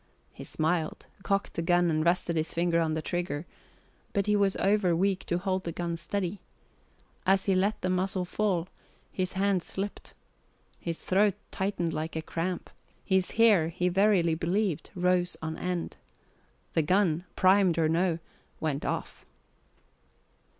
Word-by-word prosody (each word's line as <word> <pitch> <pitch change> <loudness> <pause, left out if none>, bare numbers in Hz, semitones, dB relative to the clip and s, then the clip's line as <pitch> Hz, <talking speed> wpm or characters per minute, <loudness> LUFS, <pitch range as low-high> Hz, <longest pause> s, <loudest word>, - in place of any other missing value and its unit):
He - - -9
smiled, 160 0 -1 0.2
cocked 200 +1 -1
the - - -2
gun, 175 0 +3
and 155 0 +1
rested 170 0 +1
his 160 0 0
finger 170 0 +2
on 160 -1 0
the 160 - -3
trigger; 175 -3 -2 0.7
but 200 -2 +1
he 210 0 +2
was 200 -2 +2
over 195 -3 +2
weak 190 +2 +1
to 175 - +1
hold 185 0 -1
the 170 - -3
gun 170 0 -3
steady. 185 +3 -3 0.9
As 190 0 +4
he 195 - +3
let 195 +3 +1
the 185 - -1
muzzle 185 0 0
fall, 185 -3 0 0.4
his 185 -1 -2
hand 195 -1 +1
slipped. 195 +4 -6 0.6
His 165 -1 -5
throat 200 +1 +3 0.2
tightened 190 -4 -1
like 160 +1 -3
a 160 - -2
cramp. 175 +3 -3 0.3
His 190 -2 +2
hair, 210 -8 +5
he 180 +1 0
verily 190 -3 +3
believed, 170 0 -1
rose 180 0 +1
on 160 0 -4
end. 180 -2 -3 0.8
The 160 - +3
gun 175 0 +2
primed 185 -2 +4
or 160 -1 +3
no 170 +1 +1 0.4
went 150 -2 -2
off. - - -4
180 Hz, 150 wpm, -29 LUFS, 165-195 Hz, 0.9 s, hair